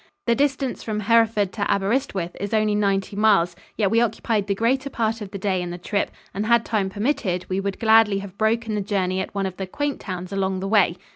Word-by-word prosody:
The 235 - +3
distance 270 0 0
from 215 -1 -3
Hereford 215 -2 +3
to 205 -2 -1
Aberyswith 200 -3 -1
is 200 +2 -2
only 215 -1 +2
ninety 200 -1 0
miles, 200 -5 +3 0.2
yet 200 -3 +2
we 230 - +4
occupied 220 -2 0
the 200 - 0
greater 260 +6 0
part 225 -3 -1
of 205 - -6
the 200 - -6
day 190 -1 0
in 175 - -4
the 175 - -5
trip, 200 +3 -1 0.2
and 205 +3 -2
had 235 -1 +4
time 205 -4 0
permitted, 200 -4 -1
we 185 +1 0
would 195 0 -3
gladly 220 -2 +5
have 195 -1 -7
broken 220 +1 0
the 210 - 0
journey 190 -2 -1
at 190 - -7
one 195 -1 0
of 185 -1 -5
the 190 - -4
quaint 290 +7 -2
towns 185 0 -6
along 190 -1 -1
the 195 - -3
way. 195 -4 +3
205 Hz, 225 wpm, -23 LUFS, 190-225 Hz, 0.2 s, gladly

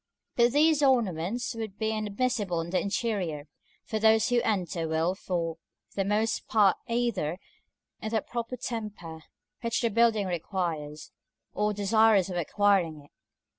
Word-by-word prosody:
But 240 0 +4
these 305 0 +4
ornaments 235 - +1
would 220 -3 -6
be 220 -1 -1
inadmissible 215 -3 -1
in 165 +1 -6
the 185 - +2
interior, 195 -8 -2 0.4
for 220 - -3
those 220 +1 +4
who 245 -1 +3
enter 180 -6 -1
will 160 +3 +1
for 170 -4 -3 0.4
the 195 - 0
most 210 +3 0
part 205 -4 +4
either 230 -10 0 0.7
be - - -5
in - - -4
the 220 -2 0
proper 240 +1 -5
temper 210 -10 -6 0.4
which 230 -1 -1
the 230 -2 +1
building 225 -2 +3
requires, 165 -4 -4 0.4
or 210 0 +1
desirous 205 -1 +3
of 175 - -3
acquiring 175 -2 +2
it. 145 0 -18
205 Hz, 145 wpm, -28 LUFS, 175-230 Hz, 0.7 s, But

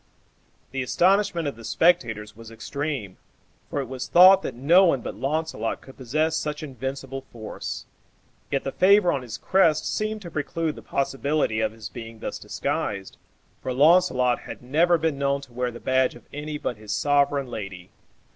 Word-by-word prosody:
The 135 - -2
astonishment 175 +4 +2
of 140 - -3
the 115 - -13
spectators 110 -10 +1
was 115 0 -11
extreme, 120 -2 -4 0.5
for - - -2
it 135 - -6
was 130 0 -5
thought 185 +2 +8
that - - -5
no 165 +10 +5
one 150 -9 +3
but - - -5
Launcelot 135 -2 -2
could 135 - -14
possess 155 +6 0
such 150 -1 -3
invincible 135 -1 -5
force; 110 -2 -6 0.6
yet 140 - -1
the 135 - -3
favor 190 +1 +5
on 140 - -1
his 120 -3 -7
crest 165 -5 +3
seemed 215 0 -2
to 170 - -8
preclude 155 +1 -2
the - - -10
possibility 140 -3 0
of 110 -1 +1
his 110 -1 -8
being 115 -1 -9
thus - - -5
disguised, 100 -1 -3 0.4
for 130 - -3
Launcelot 135 -4 +4
had - - -10
never 165 +7 +3
been 160 -3 -1
known 140 0 +1
to 130 -3 -14
wear 125 +1 -1
the 120 0 -9
badge 130 0 +1
of 120 - -15
any 150 +1 -4
but 125 -5 -3
his 105 -1 -8
sovereign 145 +2 +2
lady. 100 -7 -7
135 Hz, 175 wpm, -25 LUFS, 120-160 Hz, 0.6 s, thought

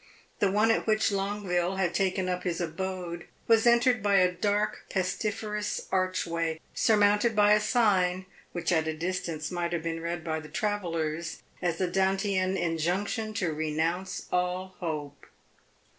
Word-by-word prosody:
The 200 - +3
one 210 +3 +3
at 225 - 0
which 215 -1 +3
Longueville 195 -2 -1
had 185 -3 0
taken 190 -1 0
up 180 0 -1
his 175 -2 -2
abode 175 0 -4 0.2
was 225 0 +5
entered 240 0 +4
by 200 -1 +2
a 185 -1 +5
dark, 205 +3 -1
pestiferous 210 +2 -2
arch 185 -1 +1
way, 165 -1 -2
surmounted 210 +1 +3
by 210 0 +6
a 210 - +5
sign 190 -5 +2 0.3
which 175 0 -2
at 160 -2 +2
a 160 0 -2
distance 170 -2 -3
might 175 -1 -2
have 165 -2 -2
been 165 0 -3
read 170 0 -3
by 160 -1 -2
the 155 -1 -11
travellers 165 -4 -2 0.2
as 175 -2 0
the 185 - +1
Dantean 190 +1 +1
injunction 185 +7 -1
to 180 -7 0
renounce 160 +4 -2
all 180 +1 -1
hope. 150 -5 -5
185 Hz, 155 wpm, -28 LUFS, 170-205 Hz, 0.3 s, by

